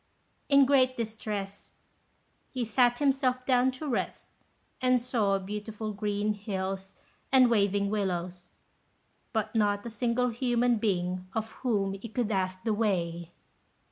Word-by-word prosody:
In 280 Hz, -1 st, +7 dB
great 255 Hz, -2 st, +3 dB
distress, 215 Hz, -3 st, -5 dB, 0.8 s
he 250 Hz, -3 st, -3 dB
sat 245 Hz, +2 st, +3 dB
himself 265 Hz, -3 st, +1 dB
down 255 Hz, 0 st, +4 dB
to 295 Hz, +4 st, -6 dB
rest, 260 Hz, -, -3 dB, 0.5 s
and 255 Hz, -1 st, +4 dB
saw 225 Hz, -5 st, +1 dB
beautiful 210 Hz, +2 st, -5 dB
green 205 Hz, +1 st, -1 dB
hills 195 Hz, -1 st, -4 dB, 0.4 s
and 255 Hz, -2 st, +6 dB
waving 200 Hz, -2 st, +2 dB
willows, 180 Hz, -3 st, -2 dB, 0.8 s
but 220 Hz, -2 st, -1 dB
not 205 Hz, -2 st, +1 dB
a 235 Hz, -, -5 dB
single 245 Hz, +2 st, 0 dB
human 240 Hz, 0 st, +1 dB
being 185 Hz, -3 st, -1 dB
of 220 Hz, 0 st, -2 dB
whom 205 Hz, -6 st, 0 dB
he 195 Hz, +4 st, -7 dB
could 225 Hz, 0 st, -1 dB
ask 185 Hz, -1 st, -1 dB
the 220 Hz, -1 st, +1 dB
way. 175 Hz, -6 st, -1 dB
215 Hz, 130 wpm, -29 LUFS, 195-245 Hz, 0.8 s, In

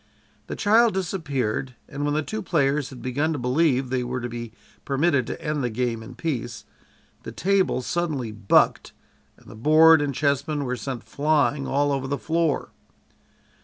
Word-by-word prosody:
The -, -, -5 dB
child 220 Hz, +1 st, +4 dB
disappeared, 140 Hz, -, -2 dB
and 145 Hz, 0 st, -5 dB
when 145 Hz, 0 st, 0 dB
the 155 Hz, -, 0 dB
two 215 Hz, +7 st, -4 dB
players 145 Hz, -5 st, 0 dB
had 130 Hz, -, -11 dB
begun 145 Hz, +5 st, 0 dB
to -, -, -3 dB
believe 130 Hz, 0 st, +1 dB
they 130 Hz, -1 st, 0 dB
were 125 Hz, +1 st, -3 dB
to 120 Hz, -, -4 dB
be 120 Hz, -1 st, -7 dB, 0.3 s
permitted 140 Hz, -2 st, +1 dB
to -, -, -5 dB
end 150 Hz, -3 st, -2 dB
the 125 Hz, -, 0 dB
game 115 Hz, 0 st, -2 dB
in 120 Hz, +3 st, -10 dB
peace, 120 Hz, -5 st, -4 dB, 0.6 s
the -, -, -8 dB
table 190 Hz, -7 st, +1 dB
suddenly 150 Hz, -8 st, -2 dB
"bucked" 105 Hz, -2 st, +2 dB, 0.4 s
and -, -, -23 dB
the -, -, -12 dB
board 155 Hz, +7 st, +6 dB
and 140 Hz, -2 st, -2 dB
chessmen 145 Hz, +1 st, 0 dB
were 125 Hz, 0 st, -2 dB
sent 125 Hz, 0 st, -5 dB
flying 145 Hz, -1 st, +1 dB
all 145 Hz, +1 st, +1 dB
over 135 Hz, -1 st, -2 dB
the 140 Hz, +1 st, -1 dB
floor. 165 Hz, -1 st, -1 dB
140 Hz, 170 wpm, -24 LUFS, 125-160 Hz, 0.6 s, board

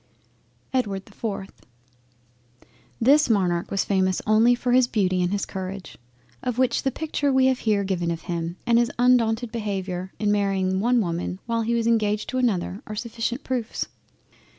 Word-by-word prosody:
EDWARD 200 Hz, -7 st, -1 dB
the -, -, -17 dB
4th 200 Hz, -4 st, -5 dB, 1.5 s
This 285 Hz, +5 st, +5 dB
Monarch 180 Hz, -5 st, +1 dB
was 195 Hz, -, 0 dB
famous 190 Hz, -2 st, +1 dB
only 220 Hz, +3 st, +5 dB
for 245 Hz, 0 st, -2 dB
his 250 Hz, 0 st, +5 dB
Beauty 185 Hz, -6 st, +1 dB
and 180 Hz, 0 st, 0 dB
his 200 Hz, 0 st, -1 dB
Courage, 190 Hz, 0 st, -6 dB, 0.5 s
of 250 Hz, -2 st, -2 dB
which 255 Hz, -1 st, +2 dB
the 270 Hz, -, +1 dB
Picture 290 Hz, 0 st, -1 dB
we 260 Hz, 0 st, +4 dB
have 260 Hz, -1 st, +2 dB
here 210 Hz, -3 st, +1 dB
given 180 Hz, -3 st, -1 dB
of 165 Hz, -1 st, -3 dB
him, 170 Hz, 0 st, -3 dB
and 235 Hz, -1 st, +4 dB
his 240 Hz, 0 st, +1 dB
undaunted 240 Hz, -1 st, +3 dB
Behaviour 190 Hz, -4 st, -3 dB
in 210 Hz, -1 st, +1 dB
marrying 195 Hz, -2 st, +1 dB
one 240 Hz, +3 st, +3 dB
Woman 175 Hz, -1 st, -3 dB
while 230 Hz, -1 st, 0 dB
he 230 Hz, +1 st, 0 dB
was 230 Hz, -1 st, 0 dB
engaged 215 Hz, -2 st, +1 dB
to 255 Hz, -, -1 dB
another, 200 Hz, -5 st, 0 dB
are 215 Hz, -, -5 dB
sufficient 235 Hz, +3 st, -3 dB
proofs. 245 Hz, -4 st, -3 dB
215 Hz, 170 wpm, -24 LUFS, 190-240 Hz, 1.5 s, This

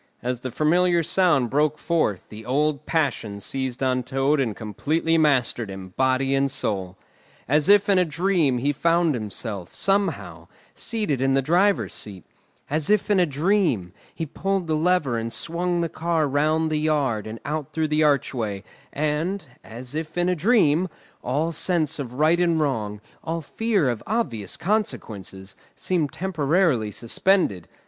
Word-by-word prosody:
As 125 Hz, 0 st, -2 dB
the 130 Hz, -, -5 dB
familiar 170 Hz, +6 st, +2 dB
sound 150 Hz, -9 st, +2 dB
broke 150 Hz, +1 st, +2 dB
forth, 155 Hz, -, 0 dB
the 110 Hz, +1 st, -10 dB
old 145 Hz, +3 st, 0 dB
passion 125 Hz, -10 st, -1 dB
seized 130 Hz, +3 st, -3 dB
on 130 Hz, -1 st, +1 dB
Toad 135 Hz, +4 st, +1 dB
and 115 Hz, -6 st, 0 dB
completely 150 Hz, +10 st, -1 dB
mastered 130 Hz, -8 st, +2 dB
him, 95 Hz, -1 st, -8 dB
body 130 Hz, +1 st, +2 dB
and 135 Hz, 0 st, +2 dB
soul. 95 Hz, -8 st, -3 dB, 0.5 s
As 150 Hz, +5 st, +2 dB
if 205 Hz, 0 st, +6 dB
in 195 Hz, -2 st, +4 dB
a -, -, +5 dB
dream 165 Hz, -4 st, +1 dB
he 140 Hz, +4 st, 0 dB
found 170 Hz, +2 st, +2 dB
himself, 105 Hz, -4 st, -5 dB
somehow, 195 Hz, 0 st, -1 dB, 0.3 s
seated 210 Hz, -, -2 dB
in 135 Hz, 0 st, +2 dB
the 135 Hz, -, +3 dB
driver's 185 Hz, +7 st, +2 dB
seat; 95 Hz, -4 st, -9 dB, 0.4 s
as 150 Hz, 0 st, -1 dB
if 210 Hz, 0 st, +2 dB
in 200 Hz, -, +4 dB
a 175 Hz, -, +3 dB
dream, 150 Hz, -, +1 dB, 0.2 s
he 165 Hz, -, -4 dB
pulled 195 Hz, +4 st, -2 dB
the 160 Hz, -, -1 dB
lever 155 Hz, -7 st, +1 dB
and 115 Hz, 0 st, -4 dB
swung 175 Hz, +8 st, -1 dB
the 170 Hz, -, 0 dB
car 165 Hz, -1 st, 0 dB
round 155 Hz, +3 st, +1 dB
the 155 Hz, -, +1 dB
yard 140 Hz, -9 st, 0 dB
and 110 Hz, +1 st, -7 dB
out 150 Hz, -1 st, -3 dB
through 160 Hz, -1 st, -1 dB
the 150 Hz, +1 st, +2 dB
archway; 120 Hz, -9 st, 0 dB, 0.3 s
and, 155 Hz, +5 st, -1 dB, 0.2 s
as 120 Hz, +3 st, -8 dB
if 155 Hz, +2 st, -5 dB
in 175 Hz, 0 st, +2 dB
a 180 Hz, -, +2 dB
dream, 180 Hz, -3 st, +3 dB, 0.3 s
all 150 Hz, +7 st, 0 dB
sense 165 Hz, -2 st, 0 dB
of 125 Hz, -3 st, -5 dB
right 155 Hz, +5 st, +3 dB
and 170 Hz, -2 st, +2 dB
wrong, 110 Hz, -8 st, -1 dB, 0.2 s
all 165 Hz, 0 st, -3 dB
fear 205 Hz, -, 0 dB
of 120 Hz, -3 st, -1 dB
obvious 115 Hz, -, -2 dB
consequences, 105 Hz, -, -3 dB, 0.2 s
seemed 165 Hz, -7 st, -1 dB
temporarily 160 Hz, -, +1 dB
suspended. 115 Hz, -, 0 dB
150 Hz, 160 wpm, -24 LUFS, 125-170 Hz, 0.5 s, if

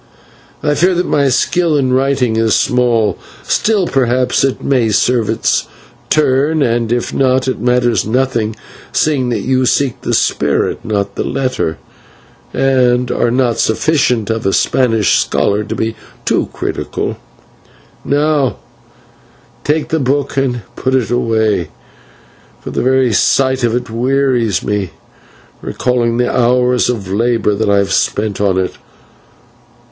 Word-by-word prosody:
I 150 Hz, -, +2 dB
fear 180 Hz, +4 st, +2 dB
that 180 Hz, -, 0 dB
my 140 Hz, -2 st, +2 dB
skill 165 Hz, +4 st, +1 dB
in 130 Hz, -2 st, +1 dB
writing 130 Hz, -3 st, +1 dB
is 110 Hz, -1 st, +2 dB
small, 120 Hz, -4 st, +1 dB, 0.2 s
still 210 Hz, -4 st, +1 dB
perhaps 125 Hz, -3 st, +1 dB
it 135 Hz, -1 st, -1 dB
may 125 Hz, -5 st, +1 dB
serve 115 Hz, +1 st, +1 dB
its -, -, 0 dB, 0.4 s
turn, 150 Hz, +1 st, +2 dB
and 115 Hz, -2 st, 0 dB
if 120 Hz, 0 st, -1 dB
not, 130 Hz, 0 st, +1 dB
it 130 Hz, -, -2 dB
matters 125 Hz, -1 st, +2 dB
nothing, 115 Hz, -2 st, -1 dB, 0.4 s
seeing 140 Hz, -5 st, +1 dB
that 115 Hz, -4 st, -1 dB
you 130 Hz, +1 st, +1 dB
seek 135 Hz, -2 st, 0 dB
the -, -, -1 dB
spirit, -, -, 0 dB
not 100 Hz, -2 st, -2 dB
the -, -, -3 dB
letter, 130 Hz, -11 st, -2 dB, 0.7 s
and 125 Hz, -2 st, +1 dB
are 120 Hz, -, +1 dB
not 120 Hz, -1 st, 0 dB
sufficient 120 Hz, -3 st, +1 dB
of 110 Hz, 0 st, -2 dB
a 95 Hz, -, +1 dB
Spanish 115 Hz, -5 st, +2 dB
scholar 105 Hz, +1 st, 0 dB
to -, -, -4 dB
be 110 Hz, 0 st, -2 dB, 0.3 s
too -, -, 0 dB
critical. -, -, -4 dB, 0.9 s
"Now 145 Hz, -2 st, +1 dB, 1.1 s
take 150 Hz, +1 st, 0 dB
the 160 Hz, -, 0 dB
book 140 Hz, +1 st, -1 dB
and 125 Hz, -4 st, -1 dB
put 130 Hz, 0 st, -1 dB
it 120 Hz, -5 st, 0 dB
away, 110 Hz, -6 st, 0 dB, 0.9 s
for -, -, -7 dB
the -, -, -1 dB
very 130 Hz, -2 st, +2 dB
sight 130 Hz, +4 st, +2 dB
of 115 Hz, -1 st, +1 dB
it 125 Hz, -1 st, -4 dB
wearies 125 Hz, -3 st, 0 dB
me, 100 Hz, -3 st, -2 dB, 0.7 s
recalling 120 Hz, -2 st, -1 dB
the 125 Hz, 0 st, 0 dB
hours 125 Hz, 0 st, +2 dB
of 110 Hz, -6 st, -3 dB
labour 115 Hz, -1 st, +1 dB
that 105 Hz, +1 st, -1 dB
I 100 Hz, -, +3 dB
have 100 Hz, -1 st, 0 dB
spent 105 Hz, -1 st, -1 dB
on 95 Hz, -2 st, +1 dB
it. 95 Hz, -1 st, -2 dB
125 Hz, 140 wpm, -15 LUFS, 115-135 Hz, 1.1 s, I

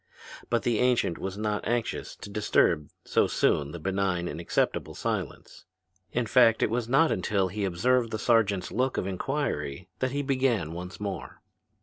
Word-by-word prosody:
But 120 Hz, -1 st, +1 dB
the 120 Hz, -3 st, +1 dB
ancient 125 Hz, -9 st, +2 dB
was 95 Hz, +1 st, -4 dB
not 105 Hz, -1 st, -2 dB
anxious 120 Hz, -1 st, -2 dB
to -, -, -10 dB
disturb 90 Hz, -7 st, +2 dB, 0.2 s
so -, -, +2 dB
soon 70 Hz, 0 st, +1 dB
the 85 Hz, -, -6 dB
benign 90 Hz, 0 st, -1 dB
and 85 Hz, -, -5 dB
acceptable 85 Hz, -, -1 dB
silence. -, -, -4 dB, 0.5 s
In 120 Hz, 0 st, 0 dB
fact 115 Hz, 0 st, +5 dB
it -, -, +1 dB
was 120 Hz, 0 st, -1 dB
not 140 Hz, +5 st, +4 dB
until 95 Hz, 0 st, 0 dB
he 100 Hz, +2 st, -2 dB
observed 115 Hz, +7 st, +2 dB
the 110 Hz, -, -3 dB
sergeant's 105 Hz, -5 st, +2 dB
look 130 Hz, +2 st, 0 dB
of -, -, 0 dB
inquiry 95 Hz, -, -3 dB
that 130 Hz, -, +1 dB
he 145 Hz, +2 st, -2 dB
began 130 Hz, -, +1 dB
once 90 Hz, +2 st, -7 dB
more. 100 Hz, -3 st, -6 dB
105 Hz, 165 wpm, -28 LUFS, 90-120 Hz, 0.5 s, fact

